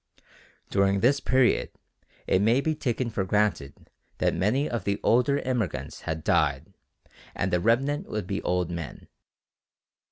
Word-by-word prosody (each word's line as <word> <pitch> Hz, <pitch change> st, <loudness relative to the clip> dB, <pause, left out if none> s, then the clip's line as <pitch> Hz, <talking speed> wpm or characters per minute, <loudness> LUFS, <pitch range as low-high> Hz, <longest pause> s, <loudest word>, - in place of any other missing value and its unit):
During 100 Hz, 0 st, +2 dB
this 140 Hz, +4 st, +3 dB
period 130 Hz, -2 st, +2 dB, 0.6 s
it 95 Hz, -, +2 dB
may 115 Hz, +5 st, +3 dB
be 155 Hz, +3 st, 0 dB
taken 125 Hz, -5 st, -2 dB
for 100 Hz, -, -1 dB
granted 95 Hz, -8 st, -1 dB, 0.3 s
that -, -, +1 dB
many 130 Hz, +10 st, +1 dB
of 120 Hz, -2 st, -3 dB
the 100 Hz, 0 st, -1 dB
older 125 Hz, +4 st, +3 dB
immigrants 125 Hz, -8 st, -3 dB
had 80 Hz, 0 st, -4 dB
died -, -, +1 dB, 0.6 s
and 95 Hz, -, -1 dB
the 90 Hz, -, +3 dB
remnant 135 Hz, -, +1 dB
would 105 Hz, -3 st, -3 dB
be 100 Hz, +2 st, -3 dB
old 90 Hz, -1 st, -1 dB
men. 85 Hz, -3 st, -7 dB
110 Hz, 140 wpm, -26 LUFS, 95-130 Hz, 0.6 s, this